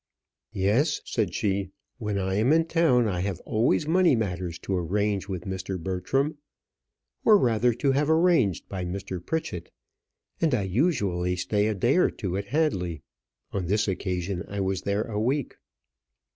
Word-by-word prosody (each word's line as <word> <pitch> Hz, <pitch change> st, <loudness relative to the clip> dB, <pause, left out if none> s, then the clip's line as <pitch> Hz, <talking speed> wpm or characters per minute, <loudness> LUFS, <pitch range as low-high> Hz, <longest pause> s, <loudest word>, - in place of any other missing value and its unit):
"Yes," 105 Hz, -, +2 dB
said 105 Hz, -8 st, -1 dB
she; 100 Hz, -2 st, 0 dB, 0.3 s
"when 105 Hz, -3 st, -2 dB
I 95 Hz, -1 st, -1 dB
am 110 Hz, +7 st, +2 dB
in 165 Hz, +1 st, +4 dB
town, 160 Hz, -9 st, +3 dB
I 90 Hz, -4 st, -1 dB
have 95 Hz, -1 st, -2 dB
always 120 Hz, +6 st, +1 dB
money 175 Hz, -3 st, +4 dB
matters 90 Hz, -6 st, -2 dB
to 95 Hz, -, -1 dB
arrange 100 Hz, +3 st, -1 dB
with 90 Hz, -3 st, -4 dB
Mr. 95 Hz, 0 st, -4 dB
Bertram, 135 Hz, -, -1 dB, 0.8 s
or 215 Hz, -2 st, +7 dB
rather 120 Hz, -, +2 dB
to 135 Hz, +3 st, +1 dB
have 145 Hz, +3 st, +1 dB
arranged 160 Hz, -, +3 dB
by 95 Hz, -2 st, -4 dB
Mr. 90 Hz, -1 st, -5 dB
Pritchett; 90 Hz, -, -3 dB, 0.7 s
and 160 Hz, -5 st, +3 dB
I 105 Hz, -, 0 dB
usually 95 Hz, -, 0 dB
stay 105 Hz, +3 st, 0 dB
a 110 Hz, -, 0 dB
day 120 Hz, -, +2 dB
or 185 Hz, -, +4 dB
two 95 Hz, -5 st, -4 dB
at 100 Hz, +1 st, -2 dB
Hadley. 95 Hz, -, -1 dB, 0.5 s
On 95 Hz, -4 st, -2 dB
this 105 Hz, +3 st, +1 dB
occasion 95 Hz, -1 st, -2 dB
I 100 Hz, -, -5 dB
was 95 Hz, -1 st, -1 dB
there 100 Hz, +2 st, 0 dB
a 110 Hz, -2 st, -4 dB
week." 135 Hz, +4 st, -1 dB
100 Hz, 160 wpm, -26 LUFS, 95-130 Hz, 0.8 s, or